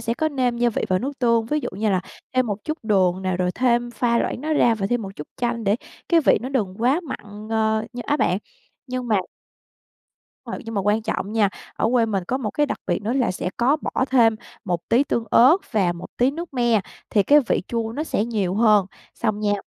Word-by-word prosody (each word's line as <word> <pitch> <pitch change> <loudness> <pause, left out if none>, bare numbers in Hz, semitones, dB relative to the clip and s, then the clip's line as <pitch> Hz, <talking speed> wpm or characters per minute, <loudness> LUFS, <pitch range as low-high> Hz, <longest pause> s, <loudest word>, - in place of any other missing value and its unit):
sẽ 230 0 -1
có 315 +4 0
nêm 255 -4 0
gia 240 0 +3
vị - - -2
vào 185 - +2
nước 275 +6 -5
tương, 230 -2 +2
ví 300 +5 0
dụ - - -3
như 210 +2 0
là 185 -2 +2 0.3
thêm 255 -1 +3
một 205 -1 -4
chút 310 +1 -3
đường 190 -3 +2
nè, 185 -1 -1
rồi 180 0 0
thêm 240 -1 +1
pha 235 -1 +1
loãng - - -2
nó 310 +1 -2
ra 240 -6 +4
và 195 -3 -2
thêm 240 +2 0
một 195 0 -8
chút 150 - -7
chanh 235 -2 -2
để 200 +3 +2 0.3
cái 335 -1 +5
vị - - +4
nó 255 - -4
đừng 215 -9 -1
quá 275 +8 +3
mặn, 210 -1 -8
ờ, 220 0 +1
như 245 -1 -5
á 290 - +2
bạn. - - +1 0.5
Nhưng 255 -2 -4
mà 210 -3 +3 1.3
Rồi, - - -5
nhưng 225 0 -6
mà 200 - +1
quan 210 +3 +1
trọng 215 -1 -3
nha, 215 -3 +3 0.3
ở 220 - 0
quê 235 -3 +3
mình 195 -4 -1
có 260 +7 -1
một 215 -6 -3
cái 295 - +1
đặc - - -4
biệt 175 +3 -1
nữa 225 +4 -1
là 260 -3 +1
sẽ 180 0 -3
có 265 +6 +3
bỏ - - -1
thêm 230 -4 +4 0.3
một 175 -3 -3
tí 250 +5 +4
tương 235 -4 -1
ớt 265 +9 +7 0.2
và 190 -6 +2
một 175 +1 -8
tí 250 +2 +3
nước 330 +1 -7
me, 240 -3 +3 0.3
thì 205 - +4
cái 295 +8 +6
vị - - +1
chua 230 -1 -2
nó 300 +6 -3
sẽ 215 -8 0
nhiều 205 -6 -1
hơn, 210 -3 +4 0.3
xong 215 -3 -1
nha 205 -1 +1
230 Hz, 245 wpm, -23 LUFS, 205-250 Hz, 1.3 s, ớt